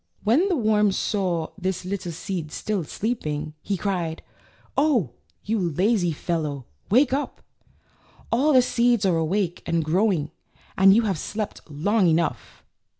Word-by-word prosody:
So - - -50
when 280 - +3
the 365 - +2
worm 215 -5 +3
saw 185 -5 -1
this 185 -1 -2
little 185 -2 -4
seed 165 -2 -5
still 205 0 -2
sleeping, 155 -8 -3
he 200 - -2
cried: 175 -5 -2 0.5
"Oh, 265 - +2 0.3
you 220 +1 -1
lazy 180 +2 +1
fellow, 150 -4 -3 0.2
wake 255 +5 +4
up! 285 +2 -3 0.9
All 275 +7 +3
the 255 -3 +6
seeds 235 -3 +2
are 180 -3 +3
awake 175 +2 -1
and 165 -2 0
grow 190 +8 +2
ing, 150 -4 -2 0.4
and 195 +1 +6
you 230 - +4
have 195 -7 -1
slept 210 +4 -4
long 185 +7 +1
enough." 165 +1 -1
190 Hz, 150 wpm, -24 LUFS, 165-220 Hz, 0.9 s, the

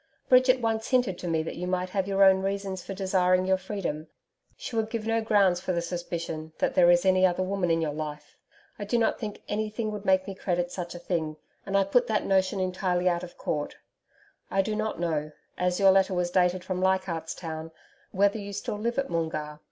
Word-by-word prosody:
Bridget 255 0 +5
once 225 -1 -1
hinted 245 -9 +1
to 180 - -5
me 160 -1 +1
that - - -6
you 180 +1 -3
might 185 0 -1
have 195 -1 -1
your 195 0 +3
own 190 -1 +6
reasons 195 -1 -3
for 195 - -6
desiring 185 -1 +2
your 190 0 +2
freedom. 185 -5 -4 0.5
She - - -6
would 220 -1 0
give 225 -1 -4
no 225 0 +1
grounds 200 -5 +3
for 185 - -2
the 170 - 0
suspicion 170 -2 -5
that - - 0
there 175 -1 +5
is 175 +1 +4
any 185 0 +4
other 185 0 +3
woman 190 -1 -1
in 165 0 +2
your 150 -2 -2
life. 150 -1 -6 0.4
I - - -3
do 205 +4 0
not 230 - +1
think 210 -3 -6
anything 215 +1 -2
would 210 -1 -6
make 190 -1 +3
me 195 - -4
credit 175 -2 -2
such 175 -1 -5
a - - -7
thing 160 -3 -2 0.3
and 195 0 +1
I 195 - +4
put 240 +6 +2
that 220 - 0
notion 190 +1 +2
entirely 185 -1 0
out 175 -1 +2
of 180 -1 -10
court. 150 -1 -3 0.7
I 195 0 +2
do 215 +2 -2
not 215 -4 -2
know 155 -3 -2 0.2
as 180 0 0
your 195 -1 +7
letter 190 0 +3
was 175 0 0
dated 180 0 +2
from 185 0 -3
Leichardt's 185 -4 0
Town 160 -2 -6 0.4
whether 200 +3 +2
you 200 0 -7
still 205 +1 -4
live 235 +2 -2
at 275 0 0
Moongarr. 155 -2 -3
185 Hz, 220 wpm, -27 LUFS, 175-200 Hz, 0.7 s, your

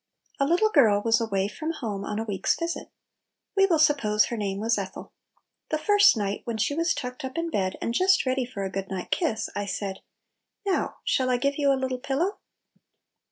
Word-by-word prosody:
A 275 - +2
LITTLE 360 +7 +3
GIEL 215 -8 +5
was 225 0 +3
away 195 -3 0
from 315 +10 -4
home 210 -9 -4
on 210 +1 -4
a 220 - -1
week's 200 -4 0
visit. 335 0 -4 0.7
We 390 0 +5
will 335 -4 +3
suppose 275 -9 +3
her 235 - -4
name 200 -3 -2
was 225 0 +1
Ethel. 190 -1 -7 0.6
The 310 - +1
first 410 - +5
night, 200 -1 -2
when 235 -2 -3
she 225 +6 0
was 330 +2 +1
tucked 250 0 -6
up 265 +2 -5
in 335 0 -2
bed, 190 -6 -1
and 230 - -1
just 375 +6 +3
ready 260 0 +1
for 235 -5 -5
a 190 - -3
good 195 0 -4
night 185 -2 -5
kiss, 290 -12 0
I 205 0 -2
said, 195 -1 -4 0.7
"Now, 390 -2 0
shall 255 -1 +1
I 250 - +2
give 280 +3 -1
you 280 -1 +4
a 270 - +2
little 260 -1 -2
pillow?" 280 +9 -1
250 Hz, 205 wpm, -26 LUFS, 205-310 Hz, 0.7 s, GIEL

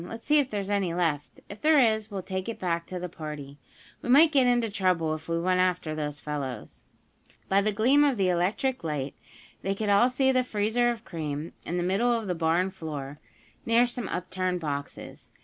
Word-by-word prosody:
Let's 225 +6 -9
see 300 +1 +4
if 275 -3 0
there's 205 -1 -3
any 190 -4 0
left. 160 -5 -2
If 205 +1 -10
there 310 0 +5
is 220 -4 +3
we'll 195 -3 -5
take 190 +3 -4
it 230 - -5
back 170 -2 -2
to 185 - -5
the 180 0 -4
party. 150 -4 -8 0.4
We - - -6
might 305 +5 +7
get 265 -4 +4
into 240 -3 +2
trouble 180 -6 +1
if 155 +1 -7
we 165 0 0
went 185 +1 +1
after 180 -3 +1
those 150 -1 -4
fellows." 140 -7 -6 0.6
By 195 +1 +3
the 215 +1 +1
gleam 250 +8 +4
of 280 -4 +2
the 190 -2 +2
electric 185 +9 0
light 145 -4 -3 0.5
they 195 +1 -1
could 210 +1 -2
all 205 +5 +5
see 265 +1 +2
the 255 -1 +2
freezer 225 +1 +1
of 230 -1 -4
cream 155 -1 -5
in 175 - -2
the 175 - 0
middle 195 +7 +2
of 230 -2 0
the 185 - -1
barn 170 +3 +1
floor, 150 -5 -7 0.4
near 230 +1 +4
some 240 -3 -4
upturned 185 0 -2
boxes. 145 -3 -6
185 Hz, 205 wpm, -27 LUFS, 165-230 Hz, 0.6 s, might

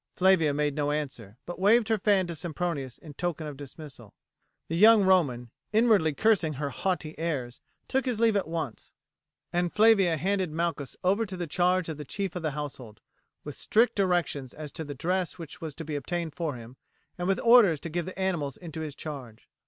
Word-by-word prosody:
Flavia 185 -5 +4
made 145 0 0
no 145 0 -1
answer, 130 -8 -4
but 175 0 -7
waved 215 +4 +4
her 220 -1 +1
fan 195 -2 +3
to 170 - -4
Sempronius 155 -5 -3
in 155 -3 -12
token 170 0 -3
of 150 -2 -6
dismissal. 135 -5 -11 0.5
The 165 - -3
young 215 +3 +7
Roman, 140 -11 +2 0.2
inwardly 215 -9 +3
cursing 195 -7 +2
her 140 0 -3
haughty 165 -1 -2
airs, 135 -8 -3 0.3
took 265 +1 0
his 245 -4 -1
leave 225 -2 +4
at 200 - 0
once, 160 -8 -5 0.6
and 175 0 +1
Flavia 210 -6 +5
handed 190 +2 0
Malchus 160 -4 -2
over 195 +5 +2
to 190 -1 -5
the 175 - -3
charge 180 +3 +1
of 160 -3 -4
the 150 - -6
chief 195 +4 -4
of 180 - -3
the 160 - 0
household, 130 -7 -7 0.4
with 150 - -6
strict 230 +3 +2
directions 175 -9 0
as 150 -2 -7
to 160 - -6
the 145 -2 -7
dress 180 +6 -1
which 165 -4 -9
was 155 -3 -6
to 165 - -7
be 150 0 -4
obtained 165 +3 -3
for 165 -6 -3
him, 120 +2 -11 0.4
and 175 - -1
with 195 - +1
orders 230 -10 +6
to 170 - -5
give 175 +1 -2
the 185 - -7
animals 170 -8 -1
into 160 -2 -7
his 150 -3 -5
charge. 130 -8 -8
165 Hz, 200 wpm, -28 LUFS, 145-190 Hz, 0.6 s, young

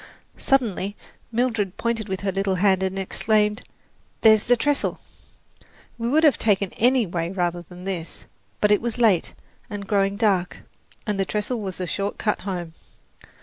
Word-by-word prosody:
Suddenly 210 -7 +1 0.4
Mildred 225 -5 0
pointed 230 -2 -1
with 190 0 -3
her 200 -1 0
little 195 0 0
hand 190 0 +3
and 190 0 -1
exclaimed, 210 +3 +1 0.6
"There's 220 -1 +6
the 245 0 +4
trestle!" 290 +4 0 1.0
We 230 +1 -1
would 310 +5 +3
have 300 -4 +5
taken 200 -3 +1
any 250 0 +3
way 170 -2 -2
rather 175 -2 -1
than 180 +1 -12
this; 180 -4 -5 0.4
but 210 - +4
it 210 - +4
was 235 0 -3
late 220 -8 +2 0.3
and 205 -1 -5
growing 195 0 +1
dark, 195 -5 +1 0.4
and 210 -2 -2
the 195 - +2
trestle 215 +4 -2
was 190 -2 -5
a 180 - -2
short 200 +3 -3
cut 210 - 0
home. 175 -4 -4
200 Hz, 160 wpm, -24 LUFS, 190-225 Hz, 1.0 s, There's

